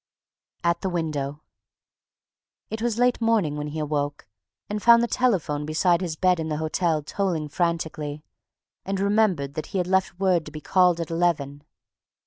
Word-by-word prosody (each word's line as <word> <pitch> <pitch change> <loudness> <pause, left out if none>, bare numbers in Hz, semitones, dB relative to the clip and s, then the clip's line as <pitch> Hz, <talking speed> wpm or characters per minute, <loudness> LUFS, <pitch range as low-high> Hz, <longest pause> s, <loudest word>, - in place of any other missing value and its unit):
AT 170 0 +1
THE 190 - -1
WINDOW 155 -4 -3 1.3
It 220 0 -4
was 235 -2 0
late 245 0 +2
morning 220 -10 +2
when 150 0 -4
he 155 +1 -3
woke 145 -1 -2 0.4
and 210 0 -3
found 235 +1 +7
the - - +1
telephone 185 - 0
beside 170 +3 +2
his 170 -4 -3
bed 180 0 +2
in 160 0 -3
the 150 - -1
hotel 160 0 0
tolling 170 -2 -2
frantically, 155 -3 -2 0.6
and 195 0 -2
remembered 195 -9 +1
that 155 - -5
he - - -4
had 180 - +1
left 190 0 0
word 185 -4 +2
to - - -8
be 155 - -7
called 180 +1 +3
at 165 -1 -4
eleven. 150 -4 0
170 Hz, 165 wpm, -25 LUFS, 150-190 Hz, 1.3 s, found